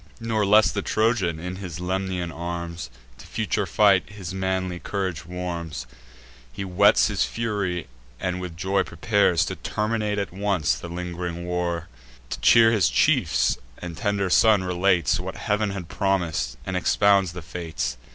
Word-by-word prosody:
Nor 110 -3 0
less 105 +2 +6
the 100 - -2
Trojan, 110 -7 +1
in 90 +2 -5
his 90 -4 -6
Lemnian 90 -1 -2
arms, 85 -3 -5 0.3
To - - -12
future - - -1
fight 100 -3 +4
his 95 -4 -7
manly 95 -1 -2
courage 95 -6 -3
warms: 85 -6 -5 0.7
He 100 - -5
whets 100 +3 +4
his 105 -2 +1
fury, 100 -7 -2 0.3
and 90 0 -2
with 85 -3 -7
joy 95 +2 +1
prepares 90 0 +2
To - - -4
terminate 105 -1 -1
at 100 -4 -3
once 95 -9 +1
the 60 +8 -7
ling'ring 85 0 -5
wars; 90 -1 -1 0.5
To - - -3
cheer 115 -1 +6
his 105 -6 +3
chiefs - - +2 0.2
and 90 -2 -7
tender 100 -3 -1
son, 110 -2 +5
relates 90 -1 +2
What - - -5
Heav'n 105 0 0
had 95 -4 -5
promis'd, 90 - -1
and 95 - -3
expounds 100 0 +3
the 90 -2 -7
fates. 80 -8 -4
90 Hz, 150 wpm, -24 LUFS, 85-100 Hz, 0.7 s, less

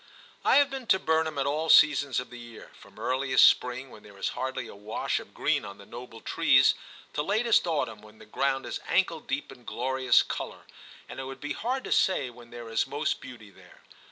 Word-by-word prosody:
I - - +4
have 285 -1 +5
been 265 -3 -6
to 190 - +5
Burnham 160 -3 0
at 135 - 0
all 155 +3 -1
seasons 145 -4 +5
of 125 - -8
the 125 - -9
year, 120 -1 -12
from - - -18
earliest 130 0 +4
spring, 125 +1 0
when 105 - -13
there 100 -1 -15
is - - -1
hardly 130 -2 -4
a - - -10
wash 105 +2 -3
of - - -14
green - - +1
on 100 0 -9
the 100 - -14
noble 120 0 -10
trees, 140 -5 +4 0.4
to 150 - -1
latest 215 +4 +2
autumn, 115 -10 -2
when 105 0 -16
the - - -14
ground 135 +4 -1
is - - -4
ankle 170 -4 +1
deep 145 -1 -4
in 125 -2 -14
glorious 130 +2 +2
colour, - - -6 0.4
and - - -9
it 135 - -5
would 135 0 -8
be 145 - -4
hard 255 +3 -2
to - - -7
say 145 -10 +2
when 120 0 -15
there 120 -1 -9
is 115 +3 0
most 145 +3 -2
beauty 120 -6 -11
there. - - -19
130 Hz, 215 wpm, -28 LUFS, 120-155 Hz, 0.4 s, have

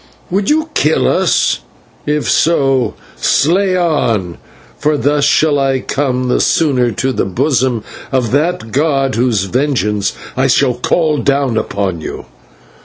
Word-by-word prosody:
"Would 195 +2 0
you 310 +1 +1
kill - - +2
us? - - +1 0.5
If 150 0 0
so, 135 -6 +2 0.2
slay 185 +5 +2
on, 115 - 0 0.4
for 150 0 +1
thus 145 0 +1
shall 145 0 +3
I 135 -1 +1
come 130 -2 -2
the 125 - +1
sooner 130 -7 +2
to 130 +6 -1
the - - -1
bosom 125 - 0 0.3
of 125 -4 0
that 150 -3 0
god 135 -1 +1
whose 115 -5 +1
vengeance 105 -3 -1 0.2
I 130 +1 +1 0.3
call 155 -1 +1
down 140 -3 0
upon 100 -6 -2
you." - - -7
135 Hz, 130 wpm, -14 LUFS, 120-150 Hz, 0.5 s, shall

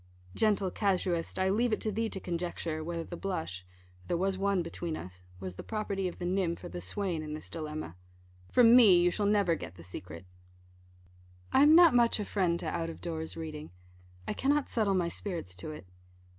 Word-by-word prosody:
Gentle 205 -4 +2
casuist, 180 -4 0
I 190 0 +2
leave 235 +4 +2
it 215 - +1
to 215 - -1
thee 225 +2 -1
to 195 - -5
conjecture, 170 -3 -3
whether 165 0 -3
the 175 - -7
blush 90 - -4 0.4
(for 90 - -22
there 175 - 0
was 190 +2 0
one 195 -1 +1
between 165 -1 -4
us) 90 0 -10 0.2
was 95 -1 -5
the - - -9
property 200 -3 -2
of 180 - -6
the 175 - -5
nymph 180 -2 -1
or - - -6
the 90 +1 -6
swain 170 - -2
in 155 0 -5
this 155 - -8
dilemma. 155 - -5 0.6
From 240 -1 +7
me 210 -8 +8
you 175 0 +3
shall 205 +3 0
never 200 -4 +3
get 85 - -6
the 85 - -12
secret. 90 -1 -8 1.3
I - - +6
am 300 +2 +8
not 340 -3 +8
much 235 -2 +4
a 210 - -2
friend 180 -5 0
to - - -4
out 165 -1 -2
of 165 - -8
doors 160 -1 -5
reading. 155 -2 -6 0.6
I - - -1
cannot 285 +1 +1
settle 210 -4 +1
my 175 -2 +1
spirits 170 - -5
to 90 - -6
it. 150 -10 -8
175 Hz, 205 wpm, -30 LUFS, 155-200 Hz, 1.3 s, me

